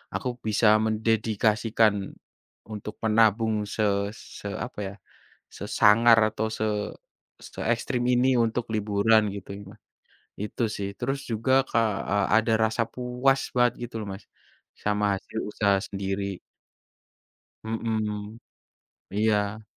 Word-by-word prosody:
aku - - -2 0.2
bisa 110 +1 +3 0.2
mendedikasikan 110 0 +2 0.8
untuk 105 0 -6
menabung 110 -1 +2
se 110 - +1 0.3
se 105 - -10 0.2
apa - - -10
ya, 95 - -7 0.6
sesangar 115 +2 +5
atau 110 +1 -2
se - - 0 0.8
seekstrem 120 +2 -2
ini 125 +2 +3 0.2
untuk 115 +1 -2
liburan 105 +1 +3
gitu 100 - -9
ya 100 - -10
Mas. 110 - -18 0.6
Itu 105 +3 -4
sih. 100 -1 -3
Terus 135 +3 -1
juga 115 +3 0 0.2
ka - - +2 0.3
eee, 100 -1 +2
ada 115 +1 +1
rasa 110 +1 +1
puas 125 +2 +1 0.2
banget 120 -1 +4 0.2
gitu - - -8
loh 105 - -6
Mas 95 - -11 0.6
sama 105 0 +1
hasil 110 +3 -6
usaha 100 -1 +2
sendiri. 100 -1 -3 1.2
Mhm, 110 -1 -3 0.7
iya. 105 0 0
110 Hz, 115 wpm, -26 LUFS, 105-115 Hz, 1.2 s, sesangar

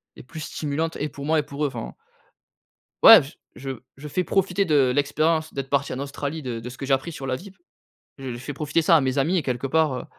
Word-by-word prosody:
et - - -11
plus 155 +6 -9
stimulantes 155 +2 -3
et 150 - -3
pour 140 0 -8
moi 160 +1 +2
et - - -1
pour 145 +1 -3
eux, - - +2
enfin 120 -5 -6 1.1
ouais! - - +11
J - - -11 0.2
je 135 +2 -6 0.3
je 145 +2 -9
fais 180 +5 -1
profiter 195 +1 +1
de 145 -7 +3
l'expérience 155 +3 +1
d'être 135 -1 -5
parti 140 0 0
en 130 - -4
Australie 145 +2 -4
de 125 -4 -4
de 115 - -7
ce 125 - -10
que 135 - -5
j'ai 135 - +4
appris 150 +6 -3
sur 135 - -7
la 130 -1 -1
vie. 190 +7 -12 0.7
Je 130 -3 -5
fais 130 +5 -6
profiter 150 +3 0
ça 165 +1 +5
à - - +4
mes 130 0 -1
amis 160 +7 +2
et 170 - +1
quelque 125 -1 -2
part, 155 0 +2
heu, 125 - -5
145 Hz, 245 wpm, -24 LUFS, 135-160 Hz, 1.1 s, ouais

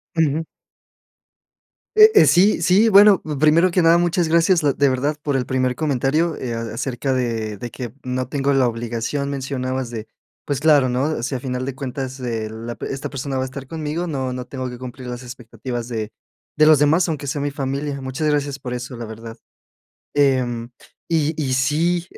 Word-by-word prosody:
Ujú. 160 -1 +1 1.5
Eh, 430 0 +8
eh, 420 - +7
sí, 190 +1 +4
sí. 190 +6 +4
Bueno, 205 -1 +7 0.2
primero 160 +4 +4
que 180 - +2
nada, 165 0 +5
muchas 175 0 +1
gracias, 170 +2 +3
la 145 -2 +3
de 140 +1 +3
verdad, 135 +4 0
por 145 -2 -1
el 130 -2 0
primer 130 0 0
comentario, 150 +3 0
eh, 125 -2 -4
acerca 120 +3 -3
de 115 -4 -2
de 120 +5 -6
que 120 -2 -7
no 130 0 -2
tengo 140 +1 0
la 135 -2 +3
obligación, 120 +4 -3
mencionabas 130 -2 -3
de 115 -2 -6 0.4
pues, 145 -2 -2
claro, 150 -4 +5
¿no?, 130 +3 -1
si 130 +2 -2
a 125 - -4
final 125 -1 -3
de 135 -1 -4
cuentas 130 0 -5
eh 115 -3 -3
la 115 +2 -7
de - - -5
esta 135 - -5
persona 135 0 -4
va - - 0
a - - -2
estar 130 0 -8
conmigo, 160 +3 -3
no 135 -5 -2
no 125 0 -5
tengo 130 0 -5
que 125 - -8
cumplir 125 0 -8
las 125 +1 -6
expectativas 120 -1 -6
de 110 -3 -4 0.4
de 155 - +5
los 155 -2 +6
demás, 155 +5 +3
aunque 150 -3 -3
sean 140 +1 -2
mi 145 - -1
familia. 140 0 -3
Muchas 130 +4 -3
gracias 145 -2 0
por 125 -3 -6
eso, 125 +1 -6
la 120 - -6
verdad. 115 +1 -9 0.8
Em, 125 -4 +1 0.4
y 160 -2 +1
y 130 -3 -1
sí, 165 +7 +1
135 Hz, 190 wpm, -21 LUFS, 125-150 Hz, 1.5 s, Eh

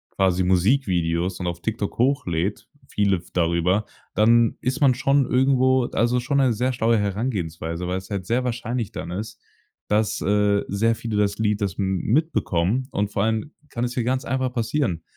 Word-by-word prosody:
quasi 95 -1 +2
Musikvideos 90 -3 +1
und 90 - -3
auf 85 0 -4
TikTok 110 -2 -3
hochlädt, 100 - 0 0.2
viele 100 -2 +1
f 85 - -13
darüber, 85 +4 +1 0.3
dann 115 +2 +4
ist 130 +5 -2
man 130 -3 +5
schon 135 +2 +2
irgendwo 130 0 +3
also 120 +2 +1
schon 130 +3 -1
'ne 130 -3 +3
sehr 125 +4 0
schlaue 115 -1 +2
Herangehensweise, 90 -6 -3
weil's 95 +1 -4
halt 100 -3 -3
sehr 120 +6 0
wahrscheinlich 120 -2 -3
dann - - -6
ist, 105 +4 -6 0.5
dass, 105 0 +1
äh, 105 0 +2
sehr 115 +4 +1
viele 115 -1 -4
das 100 -1 +1
Lied 105 -1 0
das 95 -2 -2
m 95 -1 0
mitbekommen. 125 - 0
Und 105 0 -1
vor 100 - 0
allem 110 +6 -1 0.2
kann 120 - -3
es 120 0 -2
hier 125 - -1
ganz 130 +1 -1
einfach 130 -1 -1
passieren. 115 - -1
105 Hz, 175 wpm, -23 LUFS, 95-125 Hz, 0.5 s, man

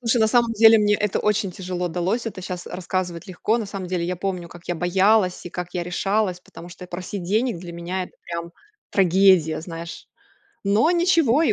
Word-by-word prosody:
Слушай, 235 0 +1
на 220 - +5
самом 235 0 +3
деле 225 0 +7
мне 210 0 +3
это 210 -1 0
очень 210 -1 +1
тяжело 180 -1 -4
далось, 185 +8 -1
это 190 -4 -6
щас 180 -1 -6
рассказывать 180 -1 -4
легко. 200 +5 -1
На 220 - -3
самом 195 -2 -6
деле 180 -2 -1
я 180 0 -2
помню, 180 -2 -3
как 175 0 -14
я 175 - 0
боялась 185 +2 +2
и - - -7
как 180 0 -5
я 175 - -2
решалась, 185 +1 -1
потому 175 0 -12
что 180 +1 -11
просить 180 +2 -6
денег 215 +2 0
для 170 -1 -8
меня 175 +2 -4
это - - -16
прям 170 0 -6 0.4
трагедия, 185 -4 +4
знаешь, 165 0 -8 0.6
но 210 - +3
ничего, 330 -6 +3
и - - +3
185 Hz, 200 wpm, -23 LUFS, 175-215 Hz, 0.6 s, деле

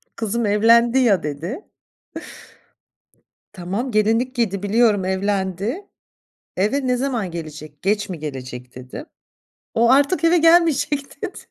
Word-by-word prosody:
"Kızım, 230 +1 -2
evlendi 230 +4 +4
ya." 210 -9 +3
dedi. 165 - -5 1.9
"Tamam, 200 +7 -4
gelinlik 225 +4 +1
giydi, 205 -6 -1
biliyorum, 210 -1 +2
evlendi. 195 - -2 0.7
Eve 260 +9 0
ne 250 0 +1
zaman 245 -7 -2
gelecek, 155 -3 -9
geç 205 +1 0
mi 180 -3 -6
gelecek?" 125 -4 -8
dedim. 130 - -9 0.7
"O 235 +1 +3
artık 285 +6 +3
eve 335 +1 +4
gelmeyecek." 325 -4 +2
dedi. - - -5
215 Hz, 115 wpm, -21 LUFS, 185-255 Hz, 1.9 s, evlendi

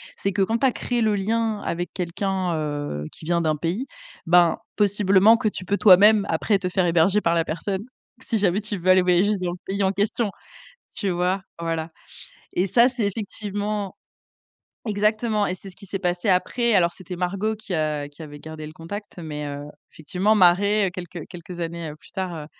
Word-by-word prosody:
c'est 195 - -1
que 195 +1 +1
quand 225 +4 0
tu 270 - +4
as - - +2
créé 240 0 -2
le 215 -2 +2
lien 220 +2 0
avec 175 0 -3
quelqu'un, 185 0 -2
heu, 145 - -3
qui - - -13
vient 170 +1 +1
d'un 155 -2 +1
pays, 175 - -2 0.4
ben, 175 0 +5 0.2
possiblement 205 +1 +4
que 235 -2 -1
tu 185 -3 -4
peux 200 +2 0
toi-même 205 +1 +7
après 195 +5 +1
te 180 -2 -2
faire 180 0 +1
héberger 170 +4 +3
par 170 -5 +1
la 165 -1 +1
personne 190 +4 -3 0.4
si 235 -3 -1
jamais 200 0 +2
tu 210 -1 -4
veux 185 +1 +3
aller 185 0 +6
voyager 180 +3 +3
dans 175 -1 -1
le - - -8
pays 200 +1 -2
en 190 - +3
question, 205 +3 0 0.7
tu 200 - -1
vois? 180 +2 0 0.2
Voilà 165 -1 -2 0.7
et 180 - +2
ça, 235 +6 +5
c'est 240 -5 -1
effectivement 205 -1 -3 0.9
exactement 215 0 +1
et 180 - -2
c'est 195 +1 -11
ce 180 - -15
qui 200 - -12
s'est 195 0 -4
passé 180 +2 -1
après 230 +5 +2
alors 175 -3 +4
c'était 180 0 -8
Margot 190 +5 -1
qui 215 -2 -8
a 155 -3 -1
qui 145 +3 -21
avait 145 -1 -10
gardé 160 0 -8
le 155 - -9
contact, 195 +6 -8
mais 150 -3 -5
heu, 145 0 -6 0.3
effectivement, 180 +7 0
Mare, 200 +2 +4
quelques 175 -2 -7
quelques 175 0 -9
années 165 -2 -4
plus - - -17
tard, 175 -5 -4
185 Hz, 195 wpm, -23 LUFS, 170-205 Hz, 0.9 s, toi-même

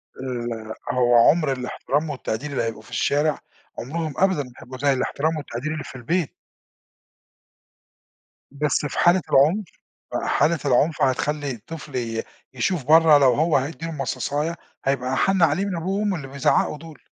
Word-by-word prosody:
ال 120 -4 -5 0.2
هو 120 -1 +3
عُمر 155 -3 +2
الاحترام 135 +4 -2
والتقدير 140 0 -4
اللي 135 - -1
هيبقوا 115 -1 -4
في 110 - -18
الشارع، 150 +1 +1 0.4
عُمرهم 155 +4 -4
أبدُا 190 -6 +2
ما 125 - -13
هيبقوا 130 +1 -9
زي 140 +1 +2
الاحترام 155 +4 -1
والتقدير 140 +1 -5
اللي 155 -2 -4
في - - -11
البيت. 150 +6 -1 2.2
بس 145 +1 0
في 145 - -3
حالة 175 +1 +5
العُنف، 170 +10 +4 0.6
حالة 160 +2 +2
العنف 140 +4 +2
هتخلي 145 +2 0
الطفل 135 +4 -9
ي 115 -2 -2 0.3
يشوف 145 +5 -1
برّه 160 0 +7
لو 135 -3 +5
هو 155 +4 +2
هيدي 150 +4 -3
له 165 - -4
مصاصاية، 150 +2 -2 0.3
هيبقى 130 -1 0
أحن 190 +7 +2
عليه 180 +4 +3
من 195 - -3
أبوه 190 +4 -2
وأمه 205 -3 0
اللي 140 -4 -7
بيزعقوا 140 +2 +1
دول. 160 -2 -12
145 Hz, 155 wpm, -23 LUFS, 130-160 Hz, 2.2 s, برّه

